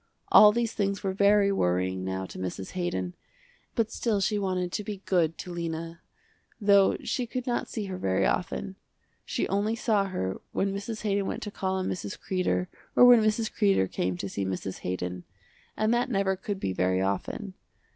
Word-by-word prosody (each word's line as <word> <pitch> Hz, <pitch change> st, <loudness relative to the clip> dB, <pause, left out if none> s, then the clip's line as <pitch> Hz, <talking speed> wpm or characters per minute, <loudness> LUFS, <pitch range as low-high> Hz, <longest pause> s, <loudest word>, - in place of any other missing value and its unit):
All 210 Hz, 0 st, +9 dB
these 230 Hz, 0 st, -1 dB
things 200 Hz, -1 st, -1 dB
were 190 Hz, -1 st, 0 dB
very 200 Hz, +1 st, +4 dB
worrying 95 Hz, -, 0 dB
now 95 Hz, 0 st, -3 dB
to -, -, -9 dB
Mrs. 95 Hz, +1 st, -5 dB
Haydon, 95 Hz, -, -2 dB, 0.6 s
but 230 Hz, -1 st, +1 dB
still 220 Hz, -4 st, 0 dB
she 210 Hz, +2 st, +1 dB
wanted 185 Hz, -2 st, -1 dB
to 210 Hz, -, -2 dB
be 200 Hz, -1 st, -6 dB
good 165 Hz, -4 st, +1 dB
to 180 Hz, -, -7 dB
Lena, 165 Hz, 0 st, -4 dB, 0.6 s
though 200 Hz, -2 st, +5 dB
she 250 Hz, -2 st, -2 dB
could 250 Hz, +1 st, -4 dB
not 240 Hz, -1 st, -1 dB
see 215 Hz, -3 st, -4 dB
her 185 Hz, -1 st, -5 dB
very 95 Hz, -, +1 dB
often. 190 Hz, +1 st, -2 dB, 0.5 s
She -, -, -1 dB
only 205 Hz, +3 st, 0 dB
saw 220 Hz, -4 st, +1 dB
her 95 Hz, -, -3 dB
when 195 Hz, 0 st, 0 dB
Mrs. 215 Hz, +3 st, -5 dB
Haydon 200 Hz, -2 st, 0 dB
went -, -, -4 dB
to 210 Hz, -, -5 dB
call 190 Hz, -1 st, -2 dB
on 185 Hz, 0 st, -1 dB
Mrs. 190 Hz, +2 st, -4 dB
Kreder 185 Hz, -1 st, 0 dB, 0.3 s
or 245 Hz, -, +8 dB
when 245 Hz, -2 st, +8 dB
Mrs. 215 Hz, +1 st, +1 dB
Kreder 195 Hz, -, +3 dB
came 90 Hz, -1 st, -2 dB
to 100 Hz, -, -4 dB
see 100 Hz, +1 st, -3 dB
Mrs. 95 Hz, 0 st, -4 dB
Haydon, 90 Hz, 0 st, -4 dB, 0.5 s
and 215 Hz, +2 st, +2 dB
that 245 Hz, +2 st, +1 dB
never 195 Hz, -4 st, +1 dB
could 195 Hz, +1 st, -4 dB
be 95 Hz, -, -2 dB
very 95 Hz, 0 st, +1 dB
often. 100 Hz, -, -2 dB
190 Hz, 185 wpm, -28 LUFS, -, 0.6 s, All